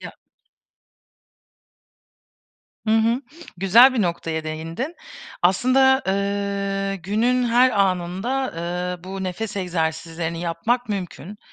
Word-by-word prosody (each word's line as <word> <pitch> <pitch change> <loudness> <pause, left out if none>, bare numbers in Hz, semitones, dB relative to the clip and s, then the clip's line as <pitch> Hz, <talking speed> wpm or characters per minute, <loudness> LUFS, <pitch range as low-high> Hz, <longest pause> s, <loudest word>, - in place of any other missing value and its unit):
Ya - - -8 2.7
Hı - - +1
hı. 230 +3 +2 0.4
Güzel 230 +8 +6
bir 225 - +2
noktaya 165 -2 -2
değindin. 165 - -5 0.5
Aslında, 265 +8 +4
ııı, 200 0 -1
günün 225 +7 0
her 245 +2 +4
anında, 195 +7 0
ııı, 180 +1 -4
bu 190 0 -5
nefes 205 +3 -4
egzersizlerini 165 -2 -2
yapmak 220 +9 -1
mümkün. 200 0 -5
195 Hz, 95 wpm, -22 LUFS, 175-230 Hz, 2.7 s, Güzel